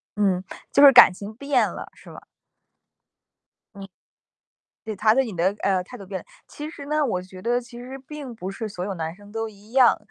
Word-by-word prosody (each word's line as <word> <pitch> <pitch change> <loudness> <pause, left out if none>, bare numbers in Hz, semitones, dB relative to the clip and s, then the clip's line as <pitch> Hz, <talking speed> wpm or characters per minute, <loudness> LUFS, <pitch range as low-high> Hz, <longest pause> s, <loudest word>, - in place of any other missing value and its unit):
嗯， 190 -3 +1 0.3
就 280 - +5
是 280 - +11
感 - - +10
情 200 +3 -8
变 280 +1 +1
了， - - -8
是 - - -16
吧？ - - -11 1.5
嗯。 195 -1 -9 1.0
对， 215 -2 -5
他 215 +2 +4
对 265 +2 +3
你 225 - -6
的 185 +4 +1
呃， 190 -2 +1
态 250 - -11
度 200 - -10
变 190 -1 -5
了。 - - -18 0.2
其 295 +1 -7
实 290 -3 -10
呢， 300 0 +1
我 180 -6 -2
觉 185 0 -12
得 240 +4 0
其 240 0 -12
实 255 +2 -8
并 285 -4 -8
不 190 -4 -6
是 215 +3 -5
所 180 -2 -5
有 195 - -3
男 160 -1 -4
生 205 +2 -16
都 225 +1 -3
一 210 0 -17
样， 255 -2 +6
215 Hz, 225 characters per minute, -24 LUFS, 190-255 Hz, 1.5 s, 是